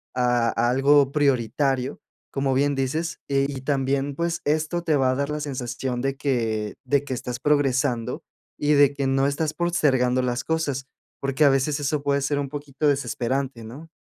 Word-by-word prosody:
a 120 -2 +2
a 120 +1 +1
algo 140 +1 +4
prioritario, 135 -1 0 0.3
como 135 -1 0
bien 145 +2 +2
dices. 155 +5 -2
Y 135 0 +2
y - - -7
también, 135 0 0
pues, 170 +2 -2
esto 155 +3 0
te 160 -3 +2
va 130 -2 +3
a - - 0
dar 140 +1 -1
la 150 0 -2
sensación 125 -2 -3
de 135 +1 -1
que 115 -6 -1
de 140 -1 +2
que 145 - -4
estás 125 0 -4
progresando 135 -3 +1 0.3
y 150 +1 +2
de 145 -1 +5
que 140 -1 -1
no 135 +1 +2
estás 150 +2 -1
postergando 130 -8 +2
las 120 -1 -1
cosas, 140 -3 -2 0.3
porque 135 +2 +1
a 140 - +7
veces 135 +2 +1
eso 145 +1 -1
puede 140 0 +1
ser 140 +1 0
un 140 -1 -3
poquito 145 0 -3
desesperante, 135 -2 -1
¿no? 135 +9 -10
140 Hz, 180 wpm, -24 LUFS, 130-145 Hz, 0.3 s, a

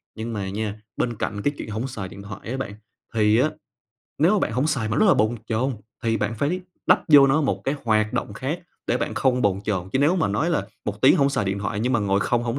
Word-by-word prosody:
Nhưng 115 +1 -5
mà 100 -2 -3
nha, 105 +1 -4 0.2
bên 120 -1 -1
cạnh 100 -1 -3
cái 145 - 0
chuyện - - -6
hổng 110 +5 -3
xài 105 -7 -5
điện 100 +2 -11
thoại 105 +2 -9
á 130 - -2
bạn, 120 -6 -4 0.4
thì 110 0 +3
á, 155 +5 +2 0.7
nếu 165 +7 +4
mà 210 - +3
bạn 155 - -1
hổng 130 +6 +1
xài 125 -8 0
mà 110 - -1
rất 215 - +4
là 195 - +6
bồn 110 +3 +1
chồn 125 +4 0 0.3
thì 115 -1 +1
bạn 105 +2 -1
phải 155 - -1 0.3
đắp - - +5
vô 145 -2 +8
nó 135 +3 +3
một 145 - 0
cái 135 - 0
hoạt 110 -1 +2
động 100 - -2
khác 140 - -3 0.3
để 120 - +2
bạn - - -3
không 125 -2 +2
bồn 100 -1 +2
chồn. 95 -4 -2
Chứ 130 - +2
nếu 155 +6 +3
mà 160 - +1
nói 105 - 0
là 165 - 0 0.2
1 105 0 -4
tiếng 130 - +7
hổng 140 -1 +3
xài 105 - 0
điện 95 +1 -1
thoại 105 +1 -3
nhưng 125 +3 0
mà 115 - +2
ngồi 100 -1 +1
không 120 +2 +1
hổng 120 +3 -2
115 Hz, 270 wpm, -24 LUFS, 105-135 Hz, 0.7 s, vô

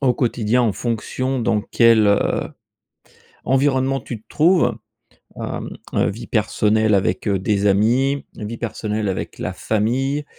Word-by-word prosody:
au 125 -3 +2
quotidien, 120 -1 +1
en 110 -4 +2
fonction 125 +4 -2
dans 110 -2 +1
quel, 115 -1 +4
heu, 100 0 +4 1.2
environnement 135 0 +1
tu 115 -2 -8
te - - -53
trouves, 170 +3 +3 0.6
hem - - -5 0.2
heu, - - +2
vie 115 +4 -8
personnelle 110 0 +1
avec 95 +1 0
des 100 +1 0
amis 125 +8 +2
vie 110 +1 -6
personnelle 110 -2 -3
avec 95 - -4
la - - -3
famille, 130 +7 -1
115 Hz, 135 wpm, -20 LUFS, 105-130 Hz, 1.2 s, quel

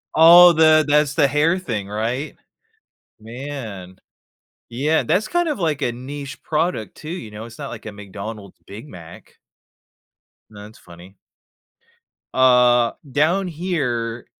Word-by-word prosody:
Oh, 175 +2 +9
the 155 -1 +5
that's 150 -1 +2
the 145 -1 +3
hair 150 +5 +1
thing, 110 - -5
right? 115 +8 -4 0.9
Man, 115 -6 -8 0.7
yeah, 145 +7 0
that's 210 +4 0
kind 350 -2 0
of 290 - -3
like 155 -5 -1
a 120 - 0
niche 135 +3 -8
product 155 - -2
too, 155 - -10
you 140 -12 -7
know? 105 +1 -9
It's 115 0 -13
not 140 -2 -6
like 115 - -10
a 110 - -6
McDonald’s 100 0 -9
Big 110 +8 -11
Mac. 85 - -14 1.1
That's 105 +1 -13
funny. 85 +2 -16 1.2
Uh, 125 -2 +4 0.2
down 170 +7 +1
here 135 -10 -3
130 Hz, 130 wpm, -20 LUFS, 110-155 Hz, 1.2 s, Oh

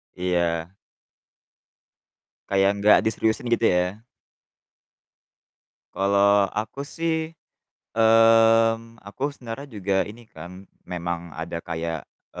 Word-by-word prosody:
Iya. 85 -1 -1 1.8
Kayak 95 0 +3
nggak 105 +1 +6
diseriusin, 110 +2 -1
gitu 115 0 +2
ya? 90 +3 0 2.0
Kalau 100 0 +3
aku 110 +6 -4
sih, 160 +1 -3 0.7
mmm, 115 0 +4
aku 130 +9 -4
sebenarnya 125 +2 -8
juga 100 -3 -2
ini 110 +3 -11
kan, 90 +4 -11 0.2
memang 85 -1 -5
ada 85 +1 -5
kayak, 80 -3 -5 0.3
e - - -6
100 Hz, 90 wpm, -24 LUFS, 90-115 Hz, 2.0 s, nggak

